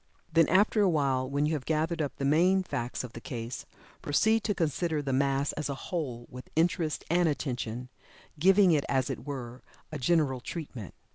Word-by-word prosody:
Then 165 -1 +5
after 205 +4 +4
a 200 - +4
while 135 -5 +1
when 140 +1 +1
you 155 - 0
have 145 -4 -2
gathered 160 +2 0
up 145 -4 -3
the 140 - -3
main 180 +7 +4
facts 120 -8 -3
of 120 -2 -8
the 115 - -8
case, 115 0 -6 0.3
proceed 220 +10 +2
to 205 - 0
consider 160 -1 0
the 140 -2 -2
mass 140 +1 +1
as 150 -2 -4
a 140 - -2
whole, 135 -6 -4
with 125 0 -10
interest 165 -1 +1
and 175 -1 +3
attention, 125 -4 -3 0.5
giving 190 +2 +6
it 150 -3 +3
as 135 0 +1
it 130 +1 -7
were 125 -3 -6 0.3
a 155 - -5
"general 140 -2 +2
treatment." 130 - -7
145 Hz, 190 wpm, -29 LUFS, 130-170 Hz, 0.5 s, giving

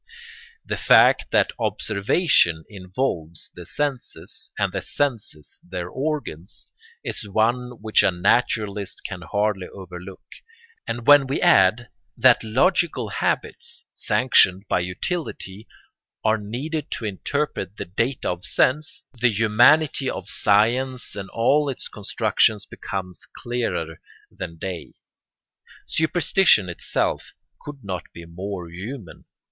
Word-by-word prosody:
The - - -3
fact - - +5
that - - +3
observation 105 - +2
involves 90 - -4
the - - -11
senses, 145 -4 -4
and - - 0
the - - -2
senses 115 - -3
their 90 -1 -5
organs, 130 - -5 0.3
is 105 - -5
one 120 +4 +1
which 110 -1 +4
a - - +4
naturalist 100 +2 0
can 90 -3 -6
hardly 100 0 -1
overlook; 90 0 -10 0.6
and 120 -1 -4
when 145 -2 +7
we 135 - -1
add 105 +6 +4 0.3
that - - +5
logical 130 - +1
habits, - - -2
sanctioned 100 -6 +3
by - - +1
utility, 95 - -4 0.6
are 110 0 +3
needed 135 +10 -4
to 115 - -4
interpret 105 - -3
the - - -4
data 115 +9 -2
of 90 0 -6
sense, 150 +9 +1
the 125 0 +2
humanity 120 +7 +4
of 100 - -5
science 120 +5 +2
and 100 -2 -6
all 140 +6 +2
its 130 - -4
constructions 105 0 +1
becomes 90 -2 -7
clearer 120 -10 -3 0.3
than 85 -2 -7
day. 90 0 -6 0.9
Superstition 160 - +3
itself 85 - -2 0.3
could 145 -2 -10
not 90 -4 -6
be 85 - -10
more 90 +1 -6
human. 95 +4 -9
105 Hz, 115 wpm, -23 LUFS, 95-130 Hz, 0.9 s, when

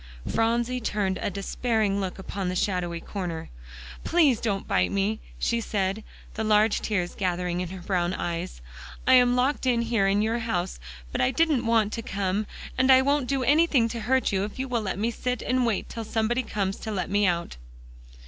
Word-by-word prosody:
Phronsie 235 +2 +1
turned 200 -4 -1
a - - 0
despairing 200 +1 0
look 185 -2 -4
upon 190 -1 -4
the 180 - -3
shadowy 180 -3 -1
corner. 170 -3 -5 0.5
"Please 305 -9 +3
don't 200 -4 -1
bite 90 - +2
me," 200 +3 0 0.2
she 235 0 0
said, 200 -1 -1 0.3
the 220 - -3
large 215 0 +3
tears 180 -5 -1
gathering 180 -1 -1
in 180 - -4
her 185 0 -8
brown 180 -1 0
eyes. 165 - -4 0.4
"I 260 - +5
am 245 -1 +6
locked 260 +2 +1
in 235 -2 +2
here 225 -4 +1
in 200 +2 +2
your 225 +2 0
house; 190 -6 -2 0.3
but - - -1
I 125 - +3
didn't 300 -8 +1
want 225 -2 +2
to 230 - -3
come, 200 0 -2 0.3
and 260 +1 +5
I 260 0 +7
won't 280 -1 +1
do 270 -1 0
anything 285 -3 +4
to 235 - -4
hurt 260 +3 +1
you 195 -1 +1
if 210 - -6
you'll 260 0 -4
let 190 -3 -3
me 225 +4 0
sit 250 +1 -2
down - - -7
and 255 -1 +2
wait 220 -4 -1
till 230 - -6
somebody 225 +3 0
comes 200 -5 -2
to 220 - -6
let 185 -3 -3
me 205 0 +3
out." 170 - -1
215 Hz, 195 wpm, -26 LUFS, 190-240 Hz, 0.5 s, I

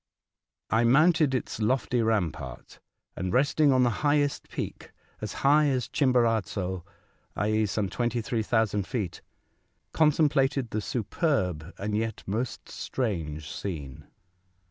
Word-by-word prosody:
I 115 +1 +3
mounted 150 +3 +4
its 125 - -3
lofty 125 +2 +1
rampart, 90 - -2 0.4
and 90 0 -3
resting 140 +3 +3
on 130 -1 +4
the 120 - +3
highest 145 -1 +1
peak, - - -6 0.3
as - - -4
high 150 +2 +6
as 130 -3 0
Chimborazo, 110 - +1 0.5
i.e., 110 +2 +1
some 100 0 -1
23,000 115 -3 0
feet, 105 -10 -3 0.7
contemplated 145 -5 +2
the 110 - -1
superb 95 - -1
and 105 +1 -2
yet 110 0 -2
most 115 +6 -3
strange 80 - -3
scene. 75 -9 -6
115 Hz, 110 wpm, -27 LUFS, 100-135 Hz, 0.7 s, high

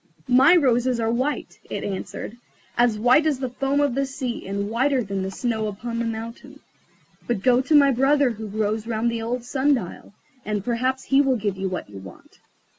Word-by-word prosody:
"My 270 +7 +7
roses 250 -5 +2
are 225 0 0
white," 260 +5 -2
it - - -4
answered; 200 +3 -5 0.4
"as 240 -2 +3
white 250 +8 +4
as 295 -4 +1
the 260 -2 -4
foam 275 +2 0
of 285 -3 +2
the 275 +2 0
sea, 260 -6 -5
and 200 +1 -2
whiter 260 +2 +1
than 195 -1 -3
the 190 - -3
snow 220 +1 -2
upon 230 +3 -5
the 235 - -1
mountain. 230 +5 -7 0.7
But 235 -5 -1
go 250 -1 +4
to 305 +4 +1
my 280 -1 +6
brother 270 +1 +3
who 220 -1 -7
grows 215 +1 -2
round 230 +1 0
the 230 -1 -3
old 235 +2 -3
sun 275 +3 +2
dial, 200 -2 -7 0.3
and 210 -2 -3
perhaps 255 +2 -1
he 275 +1 +3
will 270 -3 +2
give 205 -3 -2
you 190 0 -3
what 185 - -5
you 100 -1 -10
want." 95 -2 -14
240 Hz, 200 wpm, -23 LUFS, 215-270 Hz, 0.7 s, My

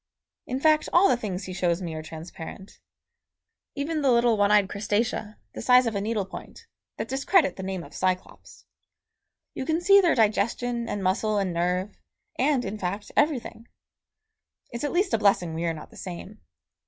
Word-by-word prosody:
In 255 +1 -2
fact 310 +1 +3
all 360 +3 +6
the - - +4
things 200 -5 -4
he 185 - -6
shows 175 -2 0
me 170 -4 -5
are 155 - -5
transparent. 165 +4 -10 1.0
Even 300 +2 -2
the 275 - +3
little 235 -1 +4
one 205 -1 +3
eyed 205 -2 +4
Crustacea, 210 +1 -2 0.2
the - - -6
size 250 +1 +5
of 230 - -1
a 200 - -1
needle 210 -1 -1
point, 325 - -11 0.3
that - - -3
discredit 280 +5 +2
the - - -7
name 190 -2 -4
of - - -13
Cyclops. 185 -1 -3 0.9
You - - -4
can 320 +4 0
see 395 +3 +6
their 350 -3 +3
digestion 235 +2 0
and 205 - -3
muscle 210 +3 +1
and 190 -3 0
nerve, 180 +4 -1 0.4
and, 265 -1 +2
in 205 +2 -5
fact, 195 +3 -4
everything. 235 -6 0 1.0
It's 235 +2 -5
at 290 - -1
least 375 +1 +1
a - - +3
blessing 195 -5 +2
we 165 +1 -3
are 165 - 0
not 155 - -11
the - - -15
same. 190 +3 -8
210 Hz, 180 wpm, -26 LUFS, 185-255 Hz, 1.0 s, all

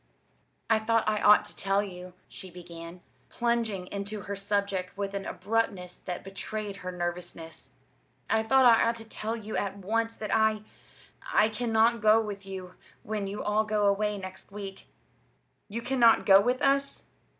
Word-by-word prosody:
"I 225 -1 +3
thought 225 0 +1
I 215 -1 +1
ought 210 0 +6
to 210 - -9
tell 195 +1 +1
you," 180 -2 -9
she 190 - -10
began, 170 0 -10 0.3
plunging 230 -6 -1
into 200 +1 -4
her 200 +1 -5
subject 200 -2 -2
with 200 -1 -3
an 200 0 -4
abruptness 195 -3 -2
that 180 -1 -6
betrayed 200 +1 -5
her 185 -2 -6
nervousness, 175 -2 -6 0.5
"I 220 - +2
thought 260 +4 +4
I 230 -2 +7
ought 230 - -1
to 225 -1 -9
tell 225 0 -3
you 215 -1 -6
at 200 0 -2
once 225 +4 -1
that 215 - -2
I 220 -1 +2 0.7
I 215 - +4
cannot 225 +1 +2
go 215 0 +6
with 200 -3 -5
you 185 -1 -7 0.3
when 210 -2 -3
you 200 +2 -5
all 210 +1 +2
go 215 -1 0
away 205 +1 +1
next 190 0 -9
week." 195 -1 -8 0.8
"You 230 +3 -5
cannot 240 -4 +4
go 195 0 +8
with 250 +4 0
us!" 275 0 +1
205 Hz, 165 wpm, -28 LUFS, 195-220 Hz, 0.8 s, go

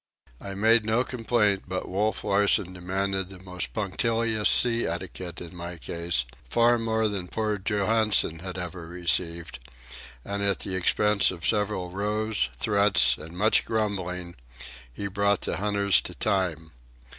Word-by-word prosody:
I 100 -1 -6
made 110 +3 +4
no 110 +3 +2
complaint, 115 -5 0
but 95 0 -4
Wolf 105 +4 -1
Larsen 100 -2 +2
demanded 95 +1 -2
the 95 - -10
most 90 -1 -5
punctilious 110 +1 0
sea 120 -1 +3
etiquette 90 -2 -5
in 85 0 -9
my 85 0 -6
case,—far 85 - 0
more 110 -1 +1
than 100 -4 -3
poor 110 0 -2
Johansen 105 -4 +1
had 95 +1 -6
ever 90 -2 -6
received; 85 -3 -1 0.7
and 100 0 -3
at 100 -2 +1
the 95 - -4
expense 105 +2 +3
of 85 -4 -5
several 105 -3 0
rows, 105 - 0
threats, 100 - +3
and 80 +3 -9
much 110 +3 +4
grumbling, 90 -5 -2 0.6
he 100 - -6
brought 100 0 +1
the - - -2
hunters 100 -2 +3
to - - -8
time. 80 -5 -1
100 Hz, 140 wpm, -26 LUFS, 90-105 Hz, 0.7 s, made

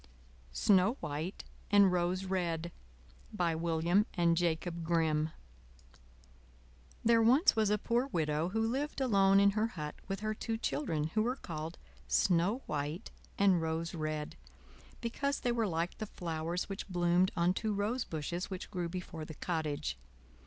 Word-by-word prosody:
SNOW 195 - +3
WHITE 155 +5 -4 0.3
AND 200 -2 +6
ROSE 180 +1 0
RED 170 -3 -1 0.6
By 175 -6 0
William 170 +5 +2
and 170 -2 +3
Jacob 170 0 -1
Grimm 160 -2 +1 1.8
There 230 0 +5
was 255 - +5
once 215 -2 +2
a 210 - +3
poor 235 +5 0
Widow 160 - 0
who 225 +3 0
lived 280 +6 -2
alone 195 -6 +4
in 200 0 +5
her 215 +2 +1
hut 150 -8 -5
with 195 +1 -3
her 215 0 -1
two 225 +1 -3
children, 160 - -1
who 215 - +2
were 245 +4 0
called 165 - -6 0.3
Snow 175 - +2
White 150 +6 -3 0.3
and 190 -4 +4
Rose 160 +1 -2
Red, 155 -2 -3 0.6
because 280 +4 -1
they 245 - +1
were 230 -2 +1
like 170 0 -2
the 215 - -3
flowers 170 -1 -3
which 195 +1 -6
bloomed 175 +1 +3
on 170 +1 +3
two 215 +3 -2
rosebushes 200 -6 -2
which 190 +1 -6
grew 175 -4 -2
before 175 -2 -6
the 155 0 -8
cottage. 155 - -2
180 Hz, 145 wpm, -33 LUFS, 160-210 Hz, 1.8 s, AND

